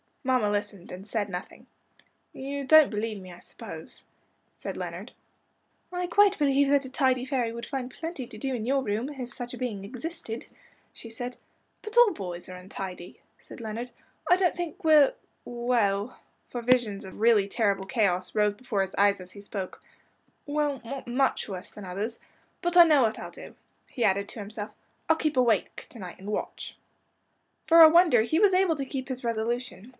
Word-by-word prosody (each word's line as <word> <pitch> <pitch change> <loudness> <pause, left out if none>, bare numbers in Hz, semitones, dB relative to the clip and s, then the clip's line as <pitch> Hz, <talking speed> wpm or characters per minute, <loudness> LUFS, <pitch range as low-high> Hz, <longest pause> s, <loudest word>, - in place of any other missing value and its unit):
Mamma 255 -5 +2
listened 205 -3 -4
and 185 +2 -8
said 210 -1 -1
nothing. 180 +1 -7 0.7
"You 280 +1 -5
don't 310 +1 +7
believe 215 0 -3
me, 185 -1 -11
I 175 - -12
suppose," - - -10 0.5
said - - -6
Leonard. - - -6 0.8
"I 360 0 -2
quite 405 +3 +4
believe 280 -1 +3
that 280 -1 +3
a 260 - -8
tidy 260 -1 +2
fairy 255 -4 -1
would 235 0 -6
find 260 -2 -4
plenty 320 -6 -6
to - - -11
do 270 -1 -2
in 225 -3 -3
your 270 +2 +1
room, 220 +4 -2
if 260 -4 -7
such 245 -1 -6
a - - -6
being 220 -6 -3
existed," 245 +1 -6 0.5
she 230 - -9
said. 245 +2 -6 0.4
"But 435 +2 -6
all 480 -4 +7
boys 180 -3 -7
are 185 - -7
untidy," 180 -1 -8 0.2
said - - -12
Leonard. 230 +2 -5 0.4
"I 360 - +8
don't 365 -2 +2
think 350 +2 -5
we're 305 -3 +6 0.3
well," 235 -3 0 0.3
for 240 - -5
visions 235 -5 +2
of 190 +1 -10
really 220 -3 +4
terrible 200 -3 0
chaos 190 -4 0
rose 210 -1 +2
before 205 -2 -2
his 190 0 -3
eyes 200 -1 +3
as 185 0 -11
he 200 - -11
spoke 200 -2 -6 0.6
"well, 290 -2 -1
not 270 +2 -6
much 255 -1 0
worse 185 -2 -6
than 210 - -10
others. 205 +6 -4 0.4
But 350 0 +1
I 345 - +11
know 300 -5 +5
what 220 -1 0
I'll - - -7
do," - - -11 0.3
he 240 - -3
added 200 0 +2
to - - -8
himself. 210 +1 -7 0.3
"I'll 320 - +6
keep 310 -3 -1
awake 235 -6 +1
to 235 - -12
night 180 -3 -8
and 200 +2 -6
watch." - - -5 0.9
For 330 0 +7
a 320 - +11
wonder 330 -8 +6
he 315 +9 +1
was 405 -2 +5
able 370 -3 +3
to 275 -2 -3
keep 260 -1 -5
his 260 -1 -5
resolution. 235 -1 -3
240 Hz, 185 wpm, -27 LUFS, 205-275 Hz, 0.9 s, I